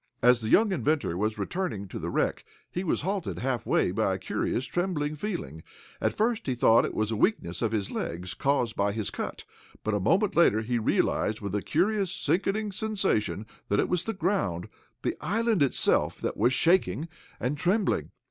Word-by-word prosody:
As 125 0 +6
the 110 - -3
young 215 - +5
inventor 150 - 0
was 105 +4 -1
returning 105 - -3
to - - -6
the - - -3
wreck, - - 0 0.3
he 180 - -2
was 180 - 0
halted 190 +2 -2
halfway 125 -3 +1
by - - +1
a - - -3
curious 130 - -2
trembling 155 -4 -1
feeling. 150 - -4 0.4
At - - +1
first 225 -2 0
he 130 - 0
thought 115 -1 +5
it - - -5
was 110 0 0
a - - 0
weakness 105 - 0
of 115 -2 +1
his 105 -3 -2
legs, 85 0 -4
caused 125 - 0
by 100 0 +1
his 110 -2 -3
cut, - - -5 0.4
but 110 - -1
a 105 - +1
moment 190 - +2
later 110 -10 +5
he 120 +2 -1
realized 110 0 +1
with 100 -2 -5
a 105 - 0
curious, 195 - +1
sickening 205 +4 0
sensation 185 - -1 0.2
that 100 - +2
it - - +1
was 180 -1 0
the 225 - -2
ground 170 - -1 0.3
the - - 0
island 225 -1 +1
itself 140 - +2
that - - -2
was 125 - +3
shaking 150 - +2 0.3
and 125 +4 -1
trembling. 195 +6 +1
135 Hz, 185 wpm, -28 LUFS, -, 0.4 s, As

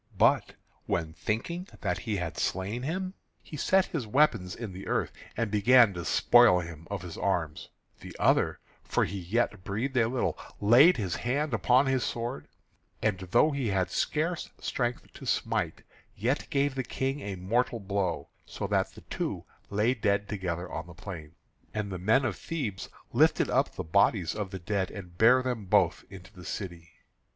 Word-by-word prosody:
But - - +3 0.3
when 80 -2 -1
thinking 170 - -3
that - - -1
he 110 -3 -2
had 85 -4 -3
slain 95 +10 -2
him 185 +7 -3 0.3
he - - -9
set 190 +6 +3
his 135 -9 -4
weapons 115 -7 +2
in 115 -5 -6
the 95 +2 -8
earth, - - 0 0.3
and 115 -2 -1
began 110 +1 +6
to 85 -1 -5
spoil 120 -7 +6
him 85 -2 -8
of 100 -2 -4
his 85 -2 -7
arms, 85 -6 -1 0.3
the - - -10
other, - - +2 0.2
for - - +1
he 100 +3 -5
yet 105 +1 -1
breathed 120 +8 -2
a 115 -2 +4
little, 125 +1 -1 0.2
laid 125 - +7
his 95 -6 -2
hand 140 +4 -1
upon 125 +6 +4
his 135 -2 +1
sword, 120 +3 -3 0.6
and 105 -4 +1
though 120 - +3
he 140 -4 -1
had 95 -3 0
scarce 165 +3 -1
strength 120 -1 -2
to - - -10
smite, - - -1 0.3
yet 120 +8 -1
gave 140 0 +1
the 130 -1 -2
King 135 +2 -2
a 100 -7 -5
mortal 115 +6 0
blow, 100 -2 -2
so - - -6
that - - 0
the - - -13
two - - -4 0.2
lay 105 +5 +2
dead 100 -4 0
together 90 -4 -3
on 80 +1 -5
the 85 - -12
plain. 85 -4 -8 0.4
And 105 -2 -2
the 90 - -4
men 110 +9 +3
of 110 -7 -2
Thebes 115 - -4 0.2
lifted - - +3
up - - +1
the - - -3
bodies 95 0 +2
of 105 -3 -4
the 95 - -5
dead, 95 +1 -1
and 90 -4 -9
bare 125 +3 +6
them 125 -5 -2
both 95 -2 +3
into 95 -1 -12
the 90 - -12
city. 85 -4 -6
105 Hz, 180 wpm, -29 LUFS, 95-125 Hz, 0.6 s, laid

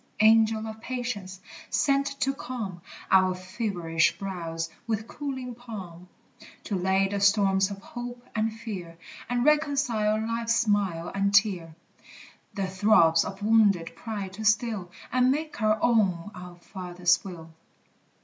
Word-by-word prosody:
Angel 220 0 +5
of 220 0 -8
Patience! 230 -7 -4 0.3
sent 275 0 +1
to 270 - +2
calm 235 -9 -6 0.3
Our 185 -1 +5
feverish 185 -3 0
brows 165 -4 -4 0.2
with 220 0 -2
cooling 260 -3 -5
palm; 190 -7 -9 0.5
To 205 - -3
lay 190 +1 +2
the 200 +1 -2
storms 195 -1 +3
of 200 - -6
hope 245 0 -8
and 220 0 +1
fear, 200 -7 -7 0.3
And 245 0 0
reconcile 275 -8 +2
life's 230 +1 0
smile 200 -7 0
and 195 0 +1
tear; 185 -6 +2 0.8
The 195 - -1
throbs 185 -4 +4
of 195 +1 -7
wounded 205 -7 +3
pride 200 -1 -5
to 215 +3 -7
still, 215 -3 +1 0.2
And 255 0 +3
make 305 0 -2
our 215 0 +3
own 205 -5 +2
our 180 -1 -10
Father's 175 -1 0
will! 165 -4 -9
205 Hz, 130 wpm, -27 LUFS, 185-230 Hz, 0.8 s, Angel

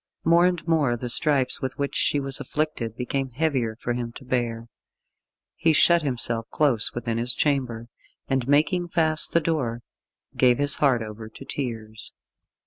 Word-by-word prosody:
More 170 +2 +5
and 175 -2 -3
more 145 -7 +2
the 125 +1 -5
stripes 135 +1 +1
with 130 - -4
which 140 0 -2
she 145 - +2
was 135 -1 +1
afflicted 150 -8 -3
became 135 +2 -2
heavier 130 -4 -1
for 120 +1 -3
him 120 -1 -4
to 130 - -12
bear. 120 -2 -2 0.9
He 160 - +2
shut 170 +2 +5
himself 115 -5 -2
close 135 -8 +2
within 115 -1 -2
his 120 +1 -1
chamber, 125 -6 -1 0.4
and 135 -2 -1
making 160 +5 +2
fast 160 -2 +2
the 170 - +4
door, 130 -8 -2 0.5
gave 125 -2 +4
his 145 0 +4
heart 130 -6 +2
over 110 0 -9
to 135 - -12
tears. 110 -6 -6
130 Hz, 160 wpm, -24 LUFS, 115-150 Hz, 0.9 s, More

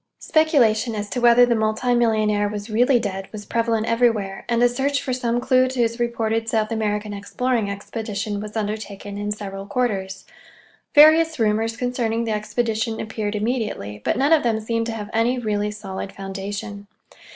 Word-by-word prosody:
Speculation 245 -8 +2
as 205 -1 -3
to 245 - -2
whether 240 +1 +7
the 240 - +1
multi 220 +2 0
millionaire 215 -3 +2
was 205 +1 -6
really 245 +4 +4
dead 195 -3 -4
was 210 -1 -8
prevalent 230 -1 0
everywhere, 225 -5 0
and 235 0 +2
a - - +7
search 270 +3 0
for 255 - -3
some 240 -1 0
clue 255 +1 +3
to 255 0 -5
his 230 0 +1
reported 225 -1 -1
South 220 -1 0
American 210 -1 -1
exploring 225 +2 -1
expedition 205 0 -4
was 210 +1 -6
undertaken 205 -1 -4
in 205 0 -3
several 195 -1 -6
quarters. 195 -7 -2 0.7
Various 320 +2 +7
rumors 225 0 0
concerning 235 -2 -1
the 225 - -2
expedition 220 +1 -1
appeared 215 -1 -3
immediately, 210 - -3
but - - 0
none 280 +5 +3
of 315 - +5
them 225 -2 0
seemed 230 +1 -2
to 230 - -3
have 210 -2 -6
any 230 +3 +2
really 210 -3 -1
solid 195 -2 -6
foundation. 200 +1 -6
220 Hz, 170 wpm, -22 LUFS, 205-240 Hz, 0.7 s, whether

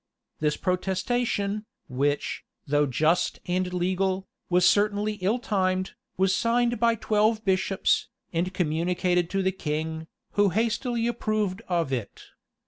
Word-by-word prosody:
This 150 -1 +1
protestation, 200 +3 -1 0.2
which, 140 +3 -1 0.2
though 145 +1 +2
just 155 +7 +1
and 180 0 -1
legal, 185 +1 0 0.2
was 180 0 +4
certainly 210 +2 +2
ill 200 +6 +2
timed, 185 -5 0 0.3
was 190 +1 +3
signed 240 0 +1
by 230 0 +3
twelve 215 0 +1
bishops, 190 0 +1 0.3
and 175 +2 0
communicated 175 +1 0
to 195 0 0
the 190 - +2
king, 160 -2 -3 0.2
who 205 -1 +3
hastily 230 +3 0
approved 215 -4 -1
of 170 -6 0
it. 120 -5 -4
190 Hz, 125 wpm, -26 LUFS, 175-215 Hz, 0.3 s, was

